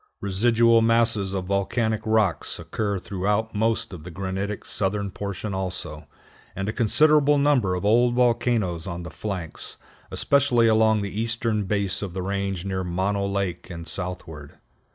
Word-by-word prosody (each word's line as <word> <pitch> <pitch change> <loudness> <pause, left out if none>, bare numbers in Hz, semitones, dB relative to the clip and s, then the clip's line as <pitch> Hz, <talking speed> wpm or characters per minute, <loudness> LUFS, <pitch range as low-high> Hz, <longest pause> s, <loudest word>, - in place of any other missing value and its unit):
Residual 115 +3 +3
masses 115 -3 +2
of 95 -2 -3
volcanic 110 +3 0
rocks 110 -5 +1
occur 100 -2 -2
throughout 105 +2 -1
most 110 -1 0
of 85 -4 -9
the 90 - -8
granitic 95 +3 -4
southern 100 0 -2
portion 100 +1 -5
also, 90 -5 -4 0.5
and 95 +1 -3
a 110 - -2
considerable 145 +5 +4
number 135 -10 +2
of 90 - -4
old 120 +3 +4
volcanoes 115 -8 +1
on 85 -1 -5
the 85 - -8
flanks, 95 -6 -6 0.3
especially 130 -5 +3
along 110 -1 +3
the 100 +2 -3
eastern 115 -2 -1
base 100 -1 -1
of 95 -3 -5
the 95 - -3
range 100 -1 -2
near 95 -1 -2
Mono 95 +3 -1
Lake 100 -3 -3
and 85 -2 -8
southward. 80 -5 -6
100 Hz, 150 wpm, -24 LUFS, 95-115 Hz, 0.5 s, considerable